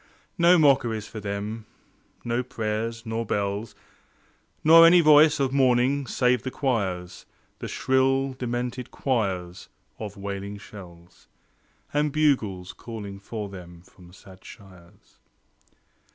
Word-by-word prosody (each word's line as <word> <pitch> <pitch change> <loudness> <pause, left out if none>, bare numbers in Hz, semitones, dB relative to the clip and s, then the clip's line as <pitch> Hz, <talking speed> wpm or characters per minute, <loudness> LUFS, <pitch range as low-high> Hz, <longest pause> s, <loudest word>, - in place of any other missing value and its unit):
No 175 +1 +6
mockeries 125 -8 +2
for 110 - -8
them; 105 +2 -5 0.6
no 120 +1 0
prayers 115 -1 -4
nor 110 +1 -3
bells, 105 +1 -3 0.9
Nor 165 +2 +8
any 175 +1 +7
voice 155 -1 +6
of 135 -1 0
mourning 130 +1 +2
save 125 -1 +1
the 130 - -4
choirs, 100 -10 -3 0.3
The - - -5
shrill, 135 +1 +1
demented 125 0 -4
choirs 95 -9 -3 0.3
of 105 -2 -7
wailing 100 +1 -6
shells; 90 -4 -14 0.7
And 150 0 +1
bugles 110 -12 0
calling 100 -2 -8
for 105 +1 -6
them 90 -3 -12
from 90 -1 -18
sad 95 0 -16
shires. 90 -3 -17
115 Hz, 115 wpm, -25 LUFS, 100-130 Hz, 0.9 s, Nor